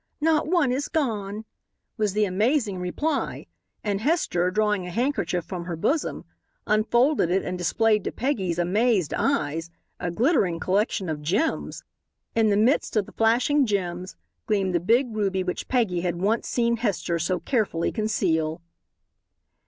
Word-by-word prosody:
Not 310 -1 +2
one 325 -6 +2
is 275 +3 -1
gone," 220 -8 -2 0.5
was 210 -4 0
the 210 +1 +2
amazing 210 +1 +1
reply, 280 - -2 0.4
and 205 -1 -1
Hester, 220 - +1
drawing 210 -1 0
a - - -5
handkerchief 185 - -1
from 180 -3 -6
her 175 -1 -3
bosom, 285 - -1 0.4
unfolded 235 - +2
it 190 +2 +1
and 180 - -3
displayed 210 +4 +2
to - - -1
Peggy's 200 - -1
amazed 190 0 +1
eyes 160 +3 0 0.3
a 175 - -2
glittering 195 - +1
collection 195 +1 0
of 155 -2 -3
gems. 195 - -1 0.5
In 225 -1 +3
the 200 - +3
midst 230 +5 +2
of 210 -2 +2
the - - -13
flashing 250 +5 +3
gems 185 -3 -2 0.3
gleamed 195 -3 +1
the 175 - +2
big 230 +6 +2
ruby 195 -3 0
which 180 -1 -4
Peggy 215 -9 +1
had 175 -1 -1
once 210 +5 0
seen 235 -1 +1
Hester 195 -6 -1
so 180 +2 0
carefully 215 -10 0
conceal. 165 -8 0
205 Hz, 150 wpm, -25 LUFS, 180-240 Hz, 0.5 s, In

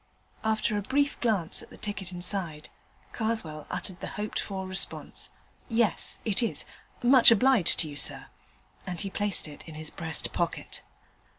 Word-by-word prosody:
After 220 0 +1
a 205 - +1
brief 280 +6 +1
glance 205 -9 +1
at - - -13
the - - -12
ticket 200 -3 -5
inside, 175 -4 -3 0.4
Karswell 220 -10 -2
uttered 185 -2 -2
the - - -4
hoped 210 +1 -2
for 190 -2 -3
response, 185 +1 -1 0.4
'Yes, 230 -2 +2
it 215 +1 +1
is; 230 - 0 0.4
much 250 0 +9
obliged 230 -3 +6
to 160 - -1
you, 145 - -7
sir,' - - 0 0.6
and 180 -2 -4
he 195 -1 -3
placed 205 -5 +1
it 150 +2 -11
in 160 - -9
his 155 0 -6
breast 160 -2 -3
pocket. - - -2
200 Hz, 160 wpm, -29 LUFS, 170-225 Hz, 0.6 s, much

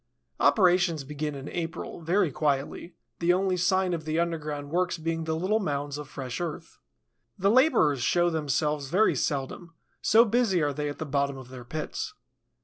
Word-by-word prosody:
Operations 175 -6 +3
begin 150 +1 -4
in 135 +1 -7
April, 170 0 -5
very 170 0 +2
quietly, 145 +4 -2 0.2
the 170 +1 +3
only 185 0 +1
sign 185 +1 +2
of 165 -2 -3
the 155 +1 -1
underground 150 -4 -3
works 180 +1 0
being 165 0 -2
the 160 0 -1
little 190 +7 +1
mounds 145 -5 -3
of 145 -2 -8
fresh 130 +2 -5
earth. 170 -3 -6 0.6
The 195 +1 +3
laborers 235 - +4
show 175 +6 +2
themselves 150 -2 -1
very 200 +7 +3
seldom, 150 +4 -3 0.3
so 225 +2 +6
busy 225 -5 +2
are 145 -2 +1
they 150 +1 -2
at 145 - -6
the 160 - -4
bottom 140 -1 -1
of 130 -2 -11
their 125 -1 -9
pits. 155 +5 -5
160 Hz, 170 wpm, -27 LUFS, 145-180 Hz, 0.6 s, so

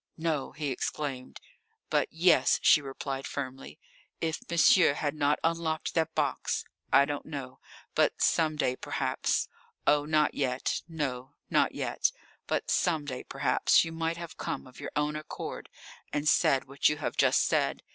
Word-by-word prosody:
"No!" 160 -4 -1
he 150 -3 -3
exclaimed. 130 0 -4 0.5
"But - - +2
yes," 175 +2 +4
she 150 - +6
replied 135 0 -5
firmly. 135 -1 -6 0.4
"If 160 -1 -2
monsieur 170 -2 +5
had 145 -1 -1
not 145 -1 +1
unlocked 165 -1 -1
that 160 -1 0
box 145 -4 -1 0.3
I 140 - +6
don't 145 0 -5
know 135 -4 -7 0.3
but - - +2
some 155 -2 +2
day 130 -4 0
perhaps - - -1 0.4
oh, 145 0 +3
not 155 -1 +2
yet, 130 -2 -1
no, 145 -4 -4 0.2
not - - +2
yet - - 0 0.4
but - - -1
some 160 -4 +1
day 130 -3 -5
perhaps - - +3
you 165 - -5
might 165 +1 -2
have 170 -1 -8
come - - -4
of 130 -1 -15
your - - -6
own 150 +1 0
accord 155 0 -6 0.4
and 145 +1 -1
said 135 -2 +4
what 140 +1 +2
you 150 - -1
have 150 - -3
just - - +4
said. - - 0
150 Hz, 155 wpm, -29 LUFS, 135-160 Hz, 0.5 s, she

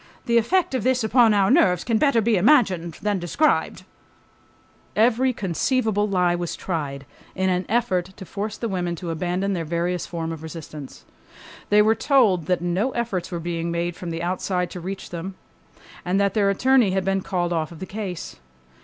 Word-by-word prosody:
The 235 -2 +4
effect 340 +8 +1
of 260 - 0
this 255 -2 +2
upon 225 +1 +4
our 200 0 +3
nerves 185 - +4
can 225 -2 +1
better 280 -6 +3
be 225 +1 +2
imagined 185 - +3
than 205 -2 0
described.... 180 - 0 1.1
Every 245 +4 +3
conceivable 210 +1 0
lie 180 -2 +2
was 175 -1 -3
tried 145 -6 -4 0.3
in 190 0 +1
an 180 0 -1
effort 210 -6 +1
to 190 - -9
force 210 +3 -5
the 230 - -3
women 180 -4 -2
to 170 0 -5
abandon 180 +4 -1
their 170 -3 -2
various 170 +2 -2
form 165 -1 -4
of 160 -2 -7
resistance. 155 -3 -9 0.6
They 210 0 +6
were 220 +1 +4
told 225 - +2
that 180 -2 +1
no 180 +8 0
efforts 230 -7 -2
were 170 - -3
being 170 0 -3
made 170 0 -2
from 175 - -7
the 165 0 -4
outside 180 0 -1
to 180 - -6
reach 190 +3 -6
them, 175 +3 -6 0.7
and 180 +2 0
that 200 -1 +2
their 205 -3 +2
attorney 250 +2 +3
had 190 0 -1
been 195 0 +1
called 175 -2 -1
off 160 -2 -1
the 170 +2 -8
case. 190 - -6
190 Hz, 180 wpm, -23 LUFS, 175-220 Hz, 1.1 s, They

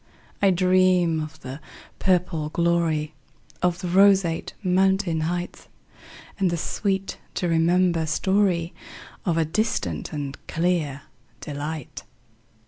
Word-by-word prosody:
I 200 - +5
dream 180 -2 +3
of 155 +1 -8
the 135 +2 -7 0.4
purple 175 -4 +1
gloryOf 170 +1 -1
the 185 - -4
roseate 190 -2 +3
mountain 190 -2 +2
heightAnd 175 +2 -4 0.8
the 170 - -1
sweet 195 +3 -2 0.2
to 180 - -1
remember 170 0 +2
storyOf 180 0 +1 0.6
a 165 -2 +2
distant 155 - -2
and 145 -2 -5
clear 160 -5 -1 0.4
delight. 150 -1 -6
170 Hz, 95 wpm, -24 LUFS, 155-185 Hz, 0.8 s, I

